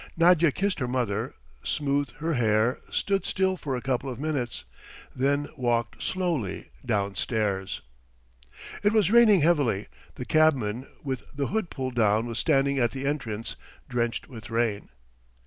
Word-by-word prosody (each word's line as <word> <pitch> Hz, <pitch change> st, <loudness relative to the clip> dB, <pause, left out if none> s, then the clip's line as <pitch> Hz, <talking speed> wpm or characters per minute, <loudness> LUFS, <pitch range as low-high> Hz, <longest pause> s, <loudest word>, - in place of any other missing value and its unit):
Nadya 170 Hz, -2 st, +5 dB
kissed 195 Hz, +5 st, -1 dB
her 125 Hz, -, -1 dB
mother, 120 Hz, -2 st, -1 dB, 0.3 s
smoothed 145 Hz, -1 st, 0 dB
her 160 Hz, +3 st, -1 dB
hair, 110 Hz, -1 st, +2 dB
stood 195 Hz, -1 st, 0 dB
still 190 Hz, 0 st, +1 dB
for 145 Hz, -7 st, -3 dB
a 125 Hz, -, -5 dB
couple 135 Hz, 0 st, -1 dB
of 125 Hz, -2 st, -6 dB
minutes... 145 Hz, -5 st, -2 dB, 0.5 s
then 140 Hz, +2 st, +1 dB
walked 120 Hz, -3 st, -1 dB
slowly 170 Hz, -, -2 dB
downstairs. 100 Hz, -2 st, -1 dB, 1.0 s
It 205 Hz, +1 st, +3 dB
was 210 Hz, -4 st, +3 dB
raining 220 Hz, -6 st, +7 dB
heavily. 145 Hz, -, +2 dB, 0.3 s
The 125 Hz, -, -6 dB
cabman 130 Hz, -7 st, +2 dB, 0.2 s
with 130 Hz, -3 st, -3 dB
the 140 Hz, -1 st, -2 dB
hood 220 Hz, -4 st, -1 dB
pulled 130 Hz, -2 st, -4 dB
down 110 Hz, -1 st, +3 dB
was 115 Hz, -1 st, -3 dB
standing 140 Hz, -3 st, +2 dB
at 120 Hz, -2 st, +3 dB
the 135 Hz, 0 st, -4 dB
entrance, 115 Hz, -7 st, -2 dB, 0.3 s
drenched 120 Hz, -1 st, -1 dB
with 115 Hz, -5 st, -10 dB
rain. 115 Hz, -3 st, 0 dB
130 Hz, 145 wpm, -27 LUFS, 115-155 Hz, 1.0 s, raining